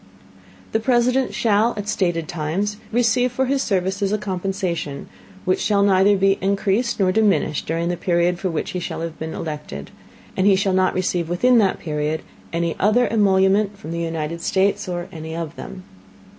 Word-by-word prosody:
The 220 - +1
President 250 +2 +2
shall, 220 +1 +2
at 205 0 -4
stated 175 -6 0
Times, 175 +6 -2
receive 245 +1 +2
for 260 +2 0
his 270 +1 0
Services, 195 -1 0
a 210 - +2
Compensation, 185 -6 -3 0.4
which 185 0 +1
shall 200 -2 +2
neither 200 +1 +4
be 195 0 +2
encreased 200 +5 0
nor 185 -2 +3
diminished 205 -7 +1
during 165 +2 -1
the 175 - 0
Period 175 0 +1
for 190 - -1
which 160 - -3
he 180 - -3
shall 170 - -5
have 165 -1 -5
been 160 0 -5
elected, 150 - -6 0.4
and 190 - +2
he 200 - +6
shall 195 0 +1
not 185 0 +2
receive 180 -2 -1
within 240 +8 +4
that 195 -4 +2
Period 150 0 -2 0.3
any 170 0 -1
other 215 +5 +3
Emolument 200 -1 +3
from 195 -6 -8
the 170 0 -3
United 165 0 -3
States, 190 +1 +1
or 175 0 -3
any 160 -2 -7
of 165 -1 -5
them. 185 - -9
190 Hz, 175 wpm, -21 LUFS, 170-205 Hz, 0.4 s, he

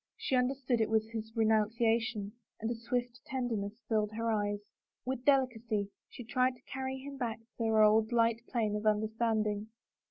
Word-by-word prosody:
She 265 - 0
understood 250 -1 +1
it 220 - +1
was 220 0 +1
his 220 -1 -5
renunciation 225 0 +2 0.3
and 225 +2 -2
a - - -1
swift 245 +1 -2
tenderness 235 -5 -3
filled 215 -1 +1
her 230 +1 0
eyes. 205 -1 0 0.4
With 260 0 -3
delicacy 235 -7 +2 0.2
she 245 - -9
tried 255 +2 +1
to 245 - -22
carry 265 0 -4
him 275 +1 -8
back 235 -4 -2
to 225 +2 -29
their 220 -1 +4
old 215 +1 +5
light 230 -1 +3
plane 220 -4 0
of 210 +1 -1
imderstanding. 215 -1 +1
225 Hz, 165 wpm, -32 LUFS, 215-245 Hz, 0.4 s, old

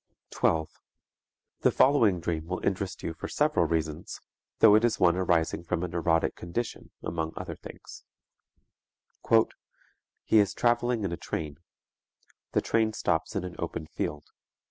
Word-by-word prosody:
The - - +4
following 115 -10 +4
dream 80 -1 -3
will 90 +1 -4
interest 95 -1 -2
you 80 - -3
for - - -6
several - - +2
reasons, 80 -2 -3 0.4
though 110 -2 +7
it 110 +2 +5
is 120 -2 +1
one 85 -1 +4
arising 85 -3 +1
from 85 0 -2
a - - -1
neurotic 85 -1 +1
condition 105 +7 -5
among 80 -1 -3
other - - -5
things: - - -12 1.2
"_He 115 0 +5 0.9
is 105 -3 +4
traveling 120 -1 +1
in 95 - -1
a 85 - -3
train. 75 -2 -5 0.9
The - - +3
train 110 -1 +1
stops 90 0 -1
in 100 - -1
an 90 -1 -6
open - - -4
field. 75 -1 -4
90 Hz, 140 wpm, -28 LUFS, 80-110 Hz, 1.2 s, though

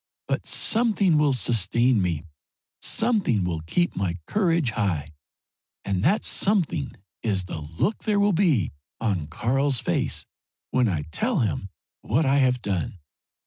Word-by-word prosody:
But - - -2
something 210 -8 +3
will 150 -2 +3
sustain 115 +1 +2
me; 85 -4 -1 0.6
something 210 - +1
will 85 -2 -2
keep 175 - 0
my 90 -2 -1
courage 170 - +1
high, 85 -9 -2 0.7
and 95 -2 -1
that 205 - +2
something 175 -8 +1 0.3
is 100 -4 0
the 90 -3 -6
look 80 - -2
there 210 -2 +2
will 200 0 +3
be 160 - +2 0.3
on 95 -9 -1
Karl's 130 - +1
face - - -1 0.5
when 125 -2 +3
I 80 -7 -1
tell 220 - 0
him 95 - -2 0.3
what 145 +8 +1
I 135 +1 +3
have 125 -2 +2
done. 95 -2 -2
120 Hz, 140 wpm, -25 LUFS, -, 0.7 s, something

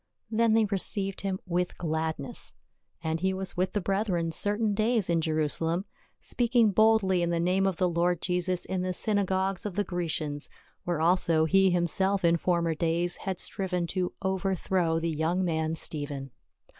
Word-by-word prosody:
Then 225 0 +3
they 225 -1 +4
received 195 -1 -1
him 190 -1 -2
with 180 -1 -1
gladness. 160 +6 -3 0.5
And 160 0 -1
he 190 +2 0
was 190 -1 -5
with 185 +1 0
the 205 - 0
brethren 185 -4 0
certain 210 +5 0
days 215 -2 +1
in 165 -1 +2
Jerusalem, 160 +3 0 0.3
speaking 235 -3 +2
boldly 205 -3 +4
in 170 - 0
the 170 -1 0
name 185 +3 +2
of 190 - 0
the 185 - +2
Lord 175 0 +1
Jesus 180 0 -1
in 190 -1 -2
the 185 0 -1
synagogues 195 -1 0
of 205 -5 -5
the 205 - +1
Grecians, 155 -5 -2 0.4
where 175 -3 -1
also 165 -2 +3
he 195 +3 +4
himself 180 +2 +1
in 170 0 +4
former 170 -1 +1
days 170 +2 0
had 190 -3 -4
striven 180 -3 -2
to 180 -2 -1
over 190 0 0
throw 170 -2 0
the 165 - -2
young 165 +4 0
man 160 -1 -1
Stephen. 145 -4 -5
180 Hz, 170 wpm, -28 LUFS, 165-195 Hz, 0.5 s, they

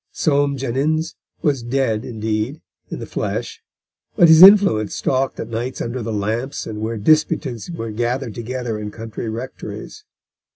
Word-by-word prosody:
Soame 140 -2 +1
Jenyns 140 +6 -1 0.3
was 145 -6 +1
dead, 120 -2 0
indeed, 110 +4 -3 0.3
in - - -5
the - - -6
flesh, - - -4 0.5
but 175 -5 +6
his 160 +1 +8
influence 190 - +7
stalked 130 0 -1
at - - -5
nights 120 +3 -4
under 120 +2 -3
the 115 0 -4
lamps 110 +6 -2
and 105 -1 -6
where 115 +1 -2
disputants 150 0 +1
were 115 -10 -5
gathered 120 +2 -2
together 120 -1 -4
in 105 0 -5
country 110 +1 -6
rectories. 120 +4 -7
120 Hz, 150 wpm, -20 LUFS, 110-140 Hz, 0.5 s, his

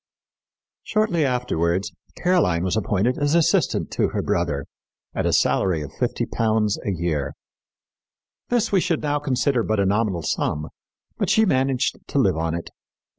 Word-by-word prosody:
Shortly 215 -7 +1
afterwards 100 - 0 0.3
Caroline 170 - +2
was 95 +1 0
appointed 110 +3 0
as 145 +2 +2
assistant 170 -2 +2
to - - +1
her - - -3
brother 70 -1 -1 0.5
at - - -1
a - - +2
salary 85 -5 +2
of 70 - -8
£50 110 -2 0
a 100 - -1
year. 85 -5 -2 1.2
This 240 -2 +1
we 195 - +4
should 165 -3 -1
now 145 0 0
consider 135 -2 +1
but 110 -1 0
a 100 - +3
nominal 100 -3 0
sum, 75 +1 -1 0.5
but - - 0
she 220 - +4
managed 130 - +1
to - - -3
live - - +3
on 80 +1 -1
it. 85 - -6
110 Hz, 150 wpm, -23 LUFS, 85-145 Hz, 1.2 s, we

